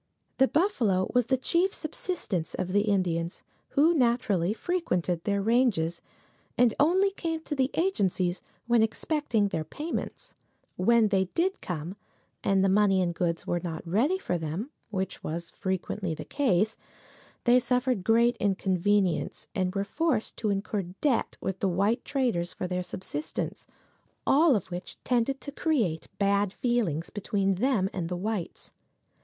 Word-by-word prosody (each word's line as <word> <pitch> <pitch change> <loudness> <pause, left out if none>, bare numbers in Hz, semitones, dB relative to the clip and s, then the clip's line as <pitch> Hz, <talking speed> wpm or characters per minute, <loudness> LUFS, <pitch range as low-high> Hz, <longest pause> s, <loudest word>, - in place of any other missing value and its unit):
The 265 - +6
buffalo 235 - +1
was 245 -2 +3
the 260 - +2
chief 345 +9 +1
subsistence 300 - -3
of 185 - -2
the 205 +2 +3
Indians, 175 -4 0 0.3
who 315 +4 +6
naturally 235 - +2
frequented 185 - -1
their 200 -1 +1
ranges, 210 -8 +2 0.6
and 245 -3 +5
only 375 +7 +4
came 330 -4 -3
to 315 - -5
the 265 -2 +1
agencies 190 - +1 0.2
when 235 -1 +4
expecting 225 -2 0
their 160 -4 -2
payments. 300 - -5 0.4
When 225 +3 +4
they 190 -1 +2
did 370 +3 +1
come, 175 +2 -5 0.5
and 195 -1 +3
the - - +4
money 195 0 +4
and 175 -2 +1
goods 170 -1 -1
were 175 - 0
not 170 -2 -5
ready 245 - +2
for 180 - -2
them, 165 - -4 0.2
which 190 -3 -3
was 170 +2 -4
frequently 190 -2 -3
the - - -7
case, 220 -6 +1 0.7
they 245 +1 +6
suffered 250 -4 0
great 235 +4 +4
inconvenience, 190 -2 +1
and 185 0 -1
were 195 - +1
forced 250 +2 -1
to 215 - -1
incur 200 +1 -1
debt 195 - -1
with 190 -1 -3
the 195 - +1
white 200 +7 +1
traders 220 -11 0
for 185 - -4
their 180 0 -1
subsistence, 160 -4 -5 0.6
all 295 0 +5
of 190 -3 -3
which 175 +1 -6
tended 250 +2 +1
to 285 - -6
create 235 - 0
bad 200 -1 +2
feelings 205 - -1
between 195 -1 0
them 215 -1 +1
and 170 -3 -3
the 180 - -2
whites. 205 -1 -4
205 Hz, 150 wpm, -28 LUFS, 180-255 Hz, 0.7 s, The